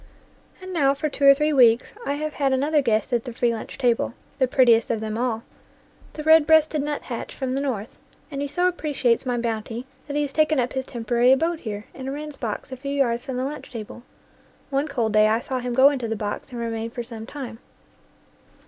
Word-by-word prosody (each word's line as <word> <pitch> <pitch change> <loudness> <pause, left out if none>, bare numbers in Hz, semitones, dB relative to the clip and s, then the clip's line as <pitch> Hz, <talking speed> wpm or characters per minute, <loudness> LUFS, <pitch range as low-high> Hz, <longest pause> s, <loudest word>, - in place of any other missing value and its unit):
And 370 0 -7
now 280 -4 +3
for 305 +2 -2
two 280 0 -1
or 275 0 +9
three 300 +2 +1
weeks 240 -3 +4
I 280 - +1
have 305 +1 -3
had 275 -2 +1
an 260 +1 +1
other 300 0 +3
guest 220 -3 0
at 235 -1 +1
the 245 - -5
free 235 0 +1
lunch 225 - -7
table, 240 -2 +1 0.2
the 260 - +3
prettiest 240 -3 +4
of 230 - 0
them 215 0 -4
all, 230 -1 -1 0.7
the 305 - -6
red 315 -1 +6
breasted 315 -1 +4
nuthatch 285 -5 -4
from 260 -2 -2
the 270 - -1
North, 235 -6 -4 0.3
and 280 -1 -4
he 285 - -1
so 355 +6 +1
appreciates 280 -8 0
my 245 -1 0
bounty 230 +1 -3 0.2
that 285 - -4
he 295 - +2
has 280 -1 -4
taken 310 -2 +3
up 245 0 0
his 265 -1 -3
temporary 240 +1 +2
abode 325 +5 +2
here 210 -5 -6
in 260 0 -7
a - - -2
wren's 300 +1 -6
box 235 +1 -5
a 260 - -5
few 275 +2 -5
yards 240 -4 +1
from 265 -2 -4
the 255 - -1
lunch 295 +2 -6
table. 230 0 -8 0.7
One 280 +2 0
cold 230 -7 -1
day 215 0 +6
I 220 +1 +2
saw 255 +1 -3
him 250 0 -3
go 270 +2 +7
into 255 -5 -3
the 225 - -2
box 205 +5 -4
and 240 - -6
remain 230 -1 -3
for 240 +1 -5
some 225 -1 -8
time. 255 -5 -7
260 Hz, 230 wpm, -24 LUFS, 230-285 Hz, 0.7 s, or